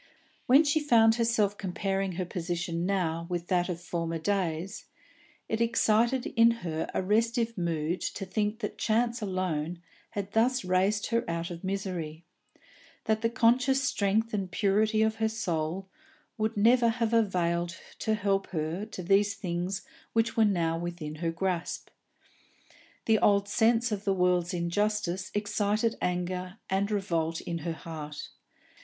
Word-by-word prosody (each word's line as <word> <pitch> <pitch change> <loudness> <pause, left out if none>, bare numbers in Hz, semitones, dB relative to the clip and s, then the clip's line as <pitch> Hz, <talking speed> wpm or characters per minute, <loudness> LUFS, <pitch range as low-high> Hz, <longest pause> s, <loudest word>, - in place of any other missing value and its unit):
When 270 +5 +7
she 295 +1 +2
found 230 -7 +5
herself 225 -3 +1
comparing 195 0 -2
her 180 +1 -2
position 175 0 -3
now 170 -4 -1
with 175 -1 -3
that 180 0 +2
of 170 -2 -3
former 165 -1 -3
days, 180 0 -2 0.6
it 220 +1 -1
excited 235 +2 +2
in 230 -1 +5 0.2
her 160 -1 -2
a - - -1
restive 230 +3 +1
mood 170 -1 -1
to 195 - -4
think 210 +3 -1
that 210 - -4
chance 235 +2 +1
alone 180 -4 -2 0.4
had 200 0 -3
thus 240 0 +2
raised 195 +4 +1
her 230 0 +2
out 170 +1 -3
of 170 +1 -8
misery, 180 -5 -4 0.8
that 220 0 +1
the 230 - +2
conscious 250 +3 +3
strength 220 -1 +1
and 195 -3 -1
purity 215 +3 +2
of 220 0 0
her 220 0 +1
soul 180 -3 -2 0.5
would 220 -1 -1
never 235 +3 +5
have 230 0 0
availed 175 -5 +1 0.2
to 220 -1 +1
help 195 -2 0
her 165 +5 -3
to 190 -4 -7
the 195 +3 +5
things 195 -2 -3 0.3
which 225 0 +1
were 225 - +5
now 165 -5 +1
within 170 -3 -5
her 165 +1 -1
grasp. 180 0 -2 1.2
The 220 -1 +4
old 200 -1 +3
sense 230 +2 +2
of 205 -1 -2
the 195 -1 +2
world's 180 -1 +2
injustice 185 +1 -1
excited 210 +2 0
anger 180 +2 -2
and 195 +1 +1
revolt 170 -6 -1
in 170 -1 -4
her 165 +1 -3
heart. 155 -2 -7
195 Hz, 150 wpm, -29 LUFS, 175-220 Hz, 1.2 s, When